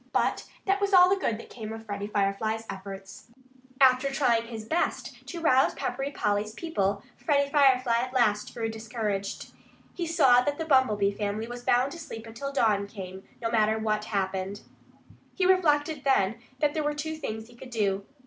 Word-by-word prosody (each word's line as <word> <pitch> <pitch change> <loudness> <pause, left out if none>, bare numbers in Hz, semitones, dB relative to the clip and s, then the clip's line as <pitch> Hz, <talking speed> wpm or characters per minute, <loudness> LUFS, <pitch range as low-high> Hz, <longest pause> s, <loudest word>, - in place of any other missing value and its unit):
But - - +1 0.2
that 395 +1 +1
was 400 -1 +3
all 360 0 +8
the - - +5
good 235 - -1
that - - -12
came 220 -3 -7
of 225 0 -8
Freddie 205 -1 -4
Firefly's 215 +2 -1
efforts. 195 0 -9 0.5
After 260 0 +5
trying 240 -5 +1
his 225 -2 -7
best 330 +9 -2
to 345 - -6
rouse 265 -5 +3
Peppery 270 +1 -3
Polly's 210 -5 -1
people, 200 - -1
Freddie 280 -2 +1
Firefly 260 -5 +4
at 250 +1 -3
last 215 -5 +1
grew 225 -1 -2
discouraged. 220 -3 -4 0.4
He 345 -2 -3
saw 270 -7 +5
that 285 +3 -1
the 325 - -3
Bumblebee 220 -9 +3
family 205 +1 -3
was 240 +1 -8
bound 250 +3 +2
to 340 - -8
sleep 225 -8 -8
until 235 +5 -6
dawn 210 -7 +2
came, 190 -2 -9 0.2
no 230 - 0
matter 220 -1 +3
what 215 -1 -1
happened. 195 0 -2 0.7
He 375 - +1
reflected, 310 -5 +2
then, 230 -5 +2 0.2
that 290 +1 +1
there 310 - -1
were 295 0 -1
two 315 +2 -3
things 220 -8 -5
he 240 - -17
could 250 +2 -11
do. 200 -4 0
230 Hz, 180 wpm, -27 LUFS, 210-280 Hz, 0.7 s, all